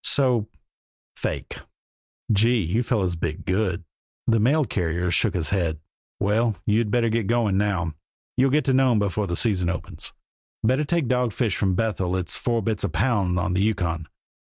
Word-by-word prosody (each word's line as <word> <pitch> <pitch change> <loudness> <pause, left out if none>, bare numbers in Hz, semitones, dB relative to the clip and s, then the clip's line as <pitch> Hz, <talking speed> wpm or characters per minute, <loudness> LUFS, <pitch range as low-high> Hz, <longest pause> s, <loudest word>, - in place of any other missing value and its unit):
So 125 -6 +3 0.7
fake!" - - -4 0.7
"Gee! 115 +4 +4
You 95 +9 0
fellers 100 -8 0
bit 80 -2 -4
good." 95 -2 0 0.4
The 115 -1 +3
mail 140 +7 +3
carrier 90 -3 -1
shook 105 +1 +2
his 80 -4 -1
head. 85 -6 0 0.4
"Well! 110 +2 +1
You'd 110 +1 +2
better 115 +1 +2
keep 115 -3 0
going 115 -4 +2
now; 95 -5 0 0.4
you'll 130 +2 +3
get 150 +3 +2
to 135 - +2
Nome 130 -3 +4
before 100 0 0
the 85 - -2
season 95 -6 +1
opens. 90 -1 -5 0.5
Better 130 +7 +2
take 165 -3 0
dogfish 120 -4 0
from 95 -3 +1
Bethel 95 -4 0
it's 90 -2 0
four 115 -3 -1
bits 110 -1 -1
a - - 0
pound 100 -6 +1
on 90 0 0
the 95 - +1
Yukon. 90 -7 -1
105 Hz, 165 wpm, -24 LUFS, 90-120 Hz, 0.7 s, Gee